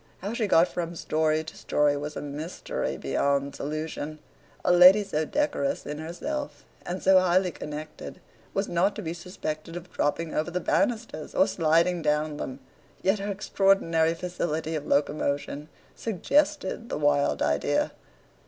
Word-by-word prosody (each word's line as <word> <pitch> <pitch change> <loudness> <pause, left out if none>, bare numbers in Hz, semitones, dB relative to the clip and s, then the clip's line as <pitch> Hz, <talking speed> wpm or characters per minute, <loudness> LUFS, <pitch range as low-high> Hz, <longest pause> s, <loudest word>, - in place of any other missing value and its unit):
How 200 +4 -3
she 230 -3 0
got 170 -2 +5
from 170 -1 -4
story 155 -1 +1
to 160 - -10
story 145 -1 +1
was 150 +1 -5
a - - -4
mystery 150 +4 -4
beyond 140 0 0
solution. 155 +1 -4 0.5
A - - +4
lady 185 +4 +8
so 155 -6 -1
decorous 285 - -1
in 150 +1 -5
herself, 285 - -5 0.2
and 180 +1 -4
so 190 0 +7
highly 185 0 +2
connected, 155 0 -7 0.3
was 195 +1 -1
not 180 +4 +1
to 215 - -5
be 165 -1 -3
suspected 165 -2 -6
of 175 +1 -8
dropping 160 +2 -1
over 155 +3 0
the 180 +1 -2
banisters 230 - -1
or 190 - +5
sliding 170 +1 +2
down 150 0 0
them, 130 -1 -6 0.4
yet 195 +2 +2
her 200 +1 -3
extraordinary 190 -5 +2
facility 165 -3 -3
of 150 -2 -3
locomotion 145 +1 0 0.3
suggested 230 - 0
the - - -2
wild 145 -1 +2
idea. 70 0 +1
165 Hz, 150 wpm, -27 LUFS, 150-190 Hz, 0.5 s, lady